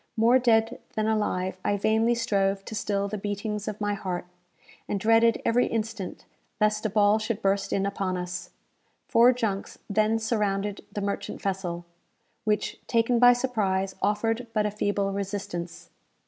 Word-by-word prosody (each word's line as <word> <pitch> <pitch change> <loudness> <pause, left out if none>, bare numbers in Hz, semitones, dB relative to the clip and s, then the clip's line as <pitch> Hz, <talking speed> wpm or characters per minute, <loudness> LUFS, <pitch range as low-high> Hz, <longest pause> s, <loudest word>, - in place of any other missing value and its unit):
More 235 +3 +5
dead 230 -1 +2 0.2
than 215 -1 0
alive, 190 -4 -1
I 205 - +1
vainly 220 +3 +2
strove 195 -4 0
to - - -7
still 200 -2 -1
the 210 +1 -4
beatings 205 +1 -3
of 210 -1 -4
my 205 -1 0
heart, 185 -3 -4 0.6
and 200 - -1
dreaded 225 +2 +4
every 245 +2 +3
instant 220 -4 -4 0.3
lest 215 0 +2
a - - -4
ball 205 +1 +4
should 220 0 -2
burst 195 0 +1
in 195 - +1
upon 195 -2 -2
us. 180 0 -5 0.6
Four 235 +2 +6
junks 220 -6 -3
then 215 +2 +2
surrounded 210 -3 -1
the 205 - -4
merchant 200 0 -3
vessel, 180 -3 -3 0.6
which, 210 -1 0
taken 235 0 +2
by 245 0 +8
surprise, 200 -7 0
offered 225 +4 0
but 215 -1 +1
a 210 - 0
feeble 200 -1 0
resistance. 195 -4 -5
210 Hz, 155 wpm, -27 LUFS, 195-225 Hz, 0.6 s, by